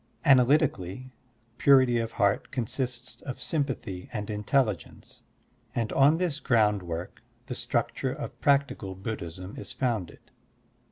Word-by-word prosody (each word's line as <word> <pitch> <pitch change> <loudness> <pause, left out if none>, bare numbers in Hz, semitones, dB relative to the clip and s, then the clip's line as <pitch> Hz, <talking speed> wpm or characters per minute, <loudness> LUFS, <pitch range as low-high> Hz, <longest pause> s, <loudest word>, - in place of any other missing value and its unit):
Analytically, 130 - +3 0.5
purity 130 -4 +5
of 115 0 -3
heart 100 -2 +1
consists 125 0 -4
of 130 - -6
sym 150 -3 0
pathy 95 -9 -6
and 105 -1 -4
intelligence, 105 - -1 0.5
and 115 -2 -1
on 145 +4 +5
this 170 -5 -1
groundwork 105 - 0 0.2
the - - -5
structure - - -1
of - - -7
practical 140 -9 +1
Buddhism 95 -2 -6
is - - -7
fotmded. 115 -10 -3
120 Hz, 115 wpm, -28 LUFS, 100-135 Hz, 0.5 s, purity